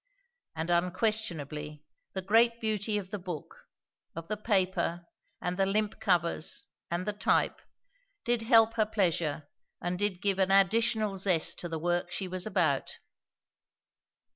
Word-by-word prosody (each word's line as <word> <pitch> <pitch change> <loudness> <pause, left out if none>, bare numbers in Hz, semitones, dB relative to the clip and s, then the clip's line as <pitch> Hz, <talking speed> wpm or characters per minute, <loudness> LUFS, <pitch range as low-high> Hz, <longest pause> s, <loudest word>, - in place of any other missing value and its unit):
And 160 +2 -2
unquestionably, 170 -6 -1 0.3
the 190 - -3
great 230 +4 +4
beauty 215 -1 0
of 195 -2 -6
the 205 - -3
book, 175 -4 -8 0.5
of 165 +2 -7
the 215 - 0
paper 185 -5 0 0.3
and 180 0 -3
the 195 -1 +2
limp 210 +2 0
covers 175 +6 0 0.2
and 175 +2 -2
the 210 - -1
type, 205 - +1 0.6
did 240 -1 +2
help 225 0 +5
her 215 - +4
pleasure 170 -8 0 0.3
and 175 +1 -3
did 205 -3 0
give 200 -1 +1
an 190 0 +3
additional 210 +1 +3
zest 180 -4 +2
to 175 - -5
the 165 - -3
work 175 +2 -1
she 185 +2 -3
was 185 +2 -2
about. 155 -9 0
190 Hz, 140 wpm, -30 LUFS, 175-215 Hz, 0.6 s, help